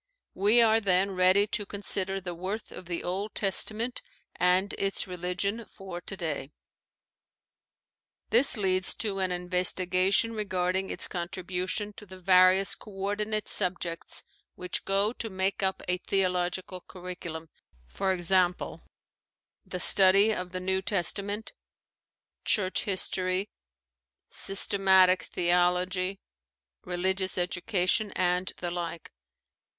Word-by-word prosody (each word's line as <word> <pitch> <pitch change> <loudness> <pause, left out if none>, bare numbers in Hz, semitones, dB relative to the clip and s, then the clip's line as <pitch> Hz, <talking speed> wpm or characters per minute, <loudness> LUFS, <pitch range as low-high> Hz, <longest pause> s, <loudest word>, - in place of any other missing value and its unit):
We 210 +5 +4
are 220 0 +4
then 195 0 +2
ready 185 +2 +4
to 210 0 -1
con 200 0 -9
sider 195 0 -2
the 180 -2 -6
worth 190 +6 -6
of 180 - -11
the 175 -1 -4
Old 195 +4 -4
Testament 220 +4 0 0.3
and 180 +3 +2
its 195 0 -1
religion 180 +5 -3
for 190 -3 -9
today. 160 -7 -5 1.8
This 245 +2 +6
leads 185 -2 +1
to 200 -3 -2
an 185 -1 -1
investigation 185 +3 +2
regarding 190 -3 -2
its - - 0
con 175 -2 -4
tribution 185 +3 -4
to 210 - -12
the 190 0 -11
various 185 +1 +5
co - - -8
ordinate 205 +2 -3
subjects 175 -3 +1 0.3
which 180 0 -4
go 200 +3 +1
to 230 - -4
make 190 +1 -1
up 190 -1 -1
a 180 0 0
theological 180 -1 -2
curriculum, 175 -3 -8 0.5
e.g., 190 -2 0
the 180 -1 +1 1.0
study 195 +3 +6
of 180 -3 -5
the 185 - -4
New 190 +1 0
Testament, 200 +3 -2 0.9
church 190 -3 0
history, 185 0 -1 0.8
systematic 190 -2 +3
theology, 180 +2 0 0.6
religious 190 +2 -1
education, 180 +3 0
and 180 0 0
the 175 -1 -4
like. 170 -1 -6
185 Hz, 115 wpm, -28 LUFS, 180-200 Hz, 1.8 s, This